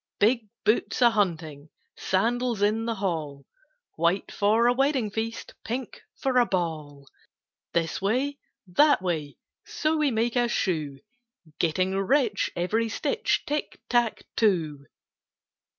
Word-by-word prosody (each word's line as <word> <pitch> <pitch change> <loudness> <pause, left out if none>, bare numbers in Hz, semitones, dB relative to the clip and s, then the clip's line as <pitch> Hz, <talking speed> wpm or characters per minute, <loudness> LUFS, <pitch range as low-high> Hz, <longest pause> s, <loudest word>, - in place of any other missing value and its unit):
"Big 220 0 +2 0.2
boots 215 - +1
a 240 - +7
hunting, 160 -8 -2 0.3
Sandals 230 +2 0
in 220 +2 +1
the 230 -1 -1
hall, 160 -8 -3 0.5
White 170 +4 +1
for 215 +3 +2
a 245 - +5
wedding 265 -4 +1
feast, 225 +2 -4
Pink 245 +2 -5
for 260 -2 +1
a 245 - +5
ball. 155 -6 -3 0.7
This 165 +1 -1
way, 260 +8 0 0.3
that 195 +5 +4
way, 155 -5 -2 0.3
So 310 0 -1
we 300 -2 +2
make 230 0 0
a 240 -1 +3
shoe; 155 -11 -2 0.6
Getting 185 +3 +1
rich 235 +5 +1
every 220 +6 0
stitch, 455 - 0
Tick 295 +1 -3
tack 240 -2 +1
too!" 160 -10 +1
210 Hz, 125 wpm, -26 LUFS, 170-240 Hz, 0.7 s, a